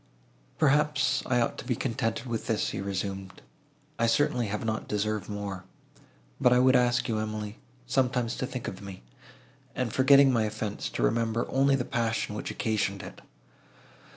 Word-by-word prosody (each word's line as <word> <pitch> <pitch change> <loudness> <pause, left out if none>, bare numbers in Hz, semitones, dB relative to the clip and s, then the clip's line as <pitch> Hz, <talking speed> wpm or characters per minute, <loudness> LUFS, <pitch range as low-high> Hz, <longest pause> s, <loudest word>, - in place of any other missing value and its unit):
"Perhaps 145 -3 +2
I 125 -1 +2
ought 115 - -1
to - - -6
be 125 - -1
contented 115 -1 -2
with 115 -3 -4
this," 110 -2 0
he - - -4
resumed; 95 -1 -4 0.6
"I 115 - +3
certainly 125 0 +2
have 105 +2 -3
not 110 -1 -2
deserved 105 -1 -2
more; 100 -2 -5 0.8
but 125 - +4
I 125 - +5
would 130 +1 +5
ask 120 -1 +3
you, 110 -2 0
Emily, 110 -1 -4 0.3
sometimes 125 -2 0
to 130 - -2
think 125 -2 -5
of 95 - -6
me, 95 -7 -9 0.7
and, 125 -4 -2
forgetting 135 0 +6
my 115 -2 +2
offence, 105 -1 -4
to - - -3
remember 115 - +1
only 135 +1 +3
the 125 -2 -1
passion 115 -2 -1
which 105 - -4
occasioned 100 -3 -1
it. - - -10
115 Hz, 165 wpm, -28 LUFS, 105-130 Hz, 0.8 s, forgetting